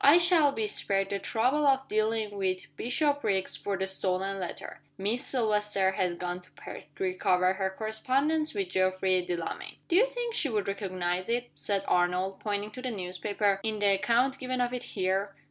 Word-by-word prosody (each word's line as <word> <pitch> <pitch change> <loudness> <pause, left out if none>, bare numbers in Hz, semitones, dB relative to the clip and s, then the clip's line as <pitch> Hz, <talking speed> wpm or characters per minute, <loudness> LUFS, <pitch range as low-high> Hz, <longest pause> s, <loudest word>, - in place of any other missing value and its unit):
I 290 +4 +8
shall 340 -4 +5
be 225 -6 -1
spared 195 -1 0
the 200 - -1
trouble 260 +9 +1
of 270 -1 +3
dealing 215 -1 0
with 185 -2 -2
Bishopriggs 250 -7 0
for 200 -1 -3
the 190 - -1
stolen 190 0 0
letter. 180 - -6 0.2
Miss 215 +7 -1
Silvester 210 -6 +1
has 180 -2 0
gone 180 +1 -4
to 180 - -20
Perth, - - -9
to - - -4
recover 185 0 +2
her 190 0 -1
correspondence 260 +9 0
with 195 -3 -1
Geoffrey 185 0 +2
Delamayn." 175 -2 -4
"Do 340 - +2
you 460 +7 +6
think 485 -2 -3
she 310 -10 +1
would 210 -4 -1
recognize 185 -2 -2
it," 240 +1 -1
said 200 -1 -1
Arnold, 180 +2 +1
pointing 205 0 -2
to 255 - -8
the 255 - -2
newspaper, 200 0 -1
"in 220 0 -2
the 205 -1 +3
account 235 +7 +2
given 255 -1 -2
of 245 0 0
it 250 - -2 0.2
here?" 195 +1 0
205 Hz, 180 wpm, -29 LUFS, 190-245 Hz, 0.2 s, I